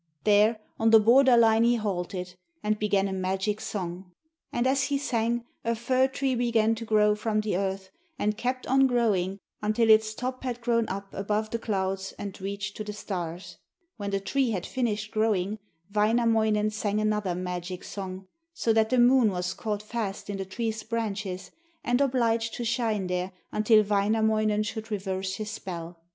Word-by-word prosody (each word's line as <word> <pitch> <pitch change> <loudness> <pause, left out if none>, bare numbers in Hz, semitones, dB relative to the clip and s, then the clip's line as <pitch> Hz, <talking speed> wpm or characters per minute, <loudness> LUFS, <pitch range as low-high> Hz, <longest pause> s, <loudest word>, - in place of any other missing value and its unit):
There, 215 +2 +4 0.2
on 225 0 +4
the 225 0 +8
border 245 +3 +6
line 225 -1 +5
he 240 +1 +4
halted, 180 -4 -3 0.3
and 210 0 0
began 200 -2 +2
a 195 - -3
magic 190 +3 -1
song. 180 -2 -5 0.4
And 240 - 0
as 270 +1 +2
he 280 +1 0
sang 235 -3 -1 0.2
a 230 0 0
fir 255 +3 +2
tree 265 0 -1
began 230 -2 +2
to 225 0 -5
grow 210 -1 +4
from 215 0 0
the 210 -3 -1
earth, 190 0 -2 0.3
and 210 +1 0
kept 255 +3 -2
on 270 +1 +4
growing 205 -7 +1 0.2
until 215 +2 +3
its 215 0 +4
top 255 +2 -4
had 245 -2 -3
grown 230 -2 +1
up 195 +1 -6
above 210 +2 -2
the 230 - -2
clouds 195 -3 -2
and 200 -2 -7
reached 200 +1 -4
to 215 - -4
the 210 0 -6
stars. 175 -4 -6 0.4
When 205 -2 -4
the 195 0 0
tree 260 +6 0
had 190 -5 -2
finished 215 -4 -2
growing, 215 -2 0 0.3
Wainamoinen 220 -1 +2
sang 210 -1 -1
another 210 -4 0
magic 180 0 -4
song, 190 -1 -7 0.3
so 225 - +1
that 220 0 +3
the 255 - +2
moon 245 -1 +5
was 180 -2 -2
caught 210 -1 -3
fast 210 -3 -4
in 200 - -4
the 195 - -4
tree's 220 +3 -3
branches 215 -4 -4 0.3
and 245 +2 +1
obliged 230 -4 +1
to 240 - -4
shine 225 -4 0
there 180 +1 -2 0.2
until 215 0 +4
Wainamoinen 215 +1 +2
should 220 +1 -5
reverse 190 -2 -3
his 210 +1 -5
spell. 170 -4 -7
215 Hz, 175 wpm, -27 LUFS, 195-230 Hz, 0.4 s, the